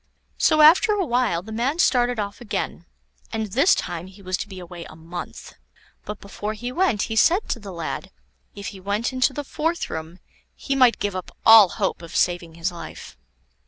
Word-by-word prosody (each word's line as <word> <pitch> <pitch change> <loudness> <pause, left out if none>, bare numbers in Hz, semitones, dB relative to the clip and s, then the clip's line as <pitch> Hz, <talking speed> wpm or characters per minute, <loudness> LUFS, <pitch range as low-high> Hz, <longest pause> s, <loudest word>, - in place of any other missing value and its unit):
So 310 - +4
after 330 +7 +7
a 400 -3 0
while 240 - 0
the 220 - -10
man 245 +8 -1
started 245 -7 +2
off 205 +2 -4
again, 225 - -4 0.4
and 220 -1 -2
this 275 - +4
time 175 -1 -4
he 195 +1 -15
was 185 0 -1
to - - -5
be 195 -2 -10
away 175 -1 -9
a - - -12
month. 170 +2 -8 0.5
But 210 0 -6
before 205 +1 -5
he 245 +3 -5
went, 275 - +1
he 225 - -3
said 355 - +3
to 240 - -1
the 200 -3 -9
lad, 170 -2 -5 0.5
if 200 0 -6
he 195 - -11
went 205 +6 -2
into 255 +2 +2
the 290 +2 -5
fourth 325 +4 -2
room 160 +2 -6 0.4
he 275 - -3
might 255 -3 +5
give 205 -2 -2
up 185 - -7
all 225 -4 +9
hope 165 - -2
of 170 - -10
saving 175 -2 0
his 170 +2 -2
life. 170 -2 -10
210 Hz, 195 wpm, -23 LUFS, 180-255 Hz, 0.5 s, all